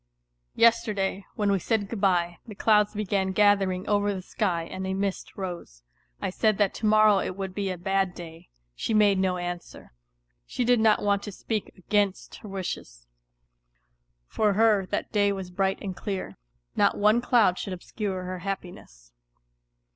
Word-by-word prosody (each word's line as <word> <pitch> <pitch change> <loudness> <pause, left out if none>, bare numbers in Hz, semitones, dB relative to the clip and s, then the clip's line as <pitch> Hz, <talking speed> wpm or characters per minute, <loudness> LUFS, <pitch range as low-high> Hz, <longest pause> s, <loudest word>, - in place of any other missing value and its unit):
Yesterday, 215 -4 +2
when 205 -1 +1
we 195 - +2
said 205 +2 -1
good 220 -1 -6
bye, 175 -3 +1
the 215 - -9
clouds 210 0 +3
began 195 -2 -1
gathering 195 -2 +2
over 205 0 +2
the 185 - -5
^ky 175 -4 -2
and 190 0 -4
a 190 - -1
mist 195 0 -3
rose. 175 - -7 0.4
I - - -2
said 215 +1 +1
that 205 -2 +2
to 215 - -2
morrow 215 -1 +5
it 185 - -3
would 190 -1 -4
be 200 0 -2
a 185 - -3
bad 195 +1 0
day; 165 -1 -11 0.2
she 220 - -2
made 205 -2 +4
no 185 -1 +1
answer, 175 - -7 0.5
she 245 - -2
did 245 0 +4
not 220 -1 +3
want 200 -1 +2
to 205 - -7
speak 215 +2 -4
against 200 +1 -1
her 210 - -11
wishes; 170 - -6 1.2
for 210 - +1
her 210 -2 +3
that - - -3
day 205 -2 +2
was 190 -2 -5
bright 195 +1 0
and 190 -2 -4
clear, 190 - -5 0.4
not - - +3
one 210 +3 +4
cloud 230 -7 +3
should 195 - -4
obscure 190 +1 -4
her 185 0 -5
happiness. 175 - -7
195 Hz, 170 wpm, -26 LUFS, 185-210 Hz, 1.2 s, morrow